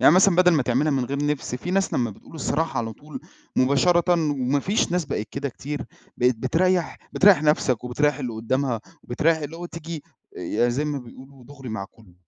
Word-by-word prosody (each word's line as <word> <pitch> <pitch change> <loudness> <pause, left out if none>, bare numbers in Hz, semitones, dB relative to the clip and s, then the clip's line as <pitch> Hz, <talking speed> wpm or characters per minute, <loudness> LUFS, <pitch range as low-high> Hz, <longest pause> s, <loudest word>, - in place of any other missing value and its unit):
يعني 140 +5 +7
مثلًا 185 -1 +5
بَدل 180 0 +6
ما 150 -5 +3
تعملها 130 +5 +1
من 135 -2 +1
غير 140 +3 -2
نِفْس 145 -4 -2
في 125 +8 -5
ناس 195 +1 +1
لمّا 120 -2 +1
بتقول 105 - -15
الصراحة 155 -2 -1
على 115 -1 -2
طول 150 +7 -10 0.4
مباشرةً، 170 +7 +3 0.2
وما 140 0 0
فيش 195 +2 0
ناس 180 -1 +1
بقت 120 -6 -3
كده 140 0 -3
كتير 140 +3 -5 0.3
بقيت 125 -1 +2
بتريّح، 175 +8 +1 0.2
بتريّح 190 -5 +6
نَفْسك 135 -6 +2
وبتريّح 145 +3 +1
اللي 125 -4 -3
قدّامها 115 +2 -1 0.2
وبتريّح 160 +7 +1
اللي 155 +1 -6
هو 175 - -6
تيجي 165 -2 -7 0.4
آآ - - -6
يعني 120 +3 +1
زي 140 +5 -1
ما 150 -1 -2
بيقولوا 130 +1 -13
دُغري 135 -1 -11
مع 110 -3 -4
كلّه. 105 -6 -20
140 Hz, 200 wpm, -24 LUFS, 125-165 Hz, 0.4 s, يعني